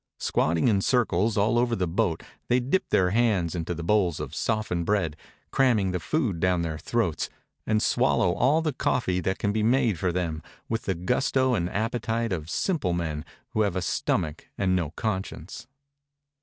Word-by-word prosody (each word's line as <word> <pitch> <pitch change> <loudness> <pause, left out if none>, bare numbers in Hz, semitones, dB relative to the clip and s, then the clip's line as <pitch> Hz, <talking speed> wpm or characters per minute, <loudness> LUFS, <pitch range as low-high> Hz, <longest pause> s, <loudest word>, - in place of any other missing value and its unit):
Squatting 85 +5 +1
in 100 -4 +3
circles 110 -3 +1
all 110 +4 +3
over 120 -1 +1
the 90 -3 -1
boat 80 -1 0 0.2
they 125 - +3
dip 135 +10 0
their 90 -1 +3
hands 105 -7 +2
into 90 0 -3
the 85 - -5
bowls 90 -3 +2
of - - -5
softened 110 -6 -1
bread, 85 -5 0 0.4
cramming 115 -8 +3
the 90 - -1
food 115 - -1
down 90 -1 +2
their 80 -2 -3
throats, 110 -8 -1 0.4
and 110 0 +2
swallow 90 - +2
all 145 - +2
the 155 -3 0
coffee 95 -8 0
that 95 +2 -1
can 100 - 0
be 110 +1 0
made 115 - +2
for 90 0 +1
them, 85 -3 -2 0.3
with 115 0 -2
the 95 - 0
gusto 125 +8 +1
and 90 -6 0
appetite 115 +1 -1
of 80 -3 -4
simple 120 - 0
mjen 80 -3 -3 0.3
who 110 - 0
have 100 -4 +1
a 95 - 0
stomach 80 0 -1
and 95 -2 +2
no 85 -5 0
conscience. 95 +1 -4
95 Hz, 180 wpm, -26 LUFS, 85-115 Hz, 0.4 s, in